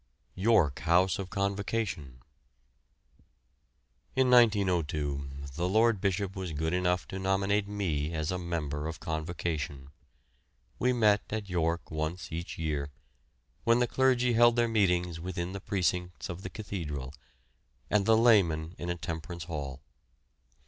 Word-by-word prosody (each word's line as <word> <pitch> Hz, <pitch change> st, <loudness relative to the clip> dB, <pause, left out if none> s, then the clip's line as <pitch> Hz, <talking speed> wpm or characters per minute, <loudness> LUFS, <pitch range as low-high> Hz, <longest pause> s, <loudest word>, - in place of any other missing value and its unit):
YORK 95 Hz, -8 st, +3 dB
HOUSE 90 Hz, +2 st, +3 dB
OF 95 Hz, -1 st, -4 dB
CONVOCATION. 100 Hz, -, -2 dB, 1.9 s
In 130 Hz, -1 st, +3 dB
1902 85 Hz, -, +3 dB, 0.2 s
the 85 Hz, +4 st, -1 dB
Lord 110 Hz, 0 st, +3 dB
Bishop 100 Hz, 0 st, -1 dB
was 95 Hz, -4 st, -4 dB
good 80 Hz, +3 st, -1 dB
enough 90 Hz, 0 st, +1 dB
to 95 Hz, -, -5 dB
nominate 95 Hz, +2 st, +1 dB
me 85 Hz, -7 st, -1 dB
as 80 Hz, 0 st, -2 dB
a 90 Hz, -, -2 dB
member 80 Hz, -4 st, -3 dB
of 80 Hz, 0 st, -6 dB
Convocation. 80 Hz, -4 st, -3 dB, 0.9 s
We 125 Hz, -, +3 dB
met 105 Hz, -4 st, +4 dB
at 105 Hz, -2 st, -4 dB
York 85 Hz, -1 st, -1 dB
once 80 Hz, +3 st, -3 dB
each 85 Hz, +2 st, -5 dB
year, 75 Hz, -3 st, -2 dB, 0.7 s
when 115 Hz, 0 st, +4 dB
the 125 Hz, -, +3 dB
clergy 125 Hz, -1 st, +2 dB
held 120 Hz, +1 st, +6 dB
their 120 Hz, -1 st, +3 dB
meetings 90 Hz, -6 st, +1 dB
within 85 Hz, 0 st, -4 dB
the 100 Hz, -, -6 dB
precincts 90 Hz, -6 st, -1 dB
of 85 Hz, +1 st, -6 dB
the -, -, -6 dB
cathedral, 75 Hz, -11 st, -5 dB, 0.7 s
and 105 Hz, -2 st, +1 dB
the 110 Hz, 0 st, +6 dB
laymen 90 Hz, -9 st, +4 dB
in 85 Hz, -, -4 dB
a 85 Hz, -, 0 dB
temperance 85 Hz, 0 st, -5 dB
hall. 70 Hz, -5 st, -6 dB
90 Hz, 135 wpm, -30 LUFS, 80-100 Hz, 1.9 s, held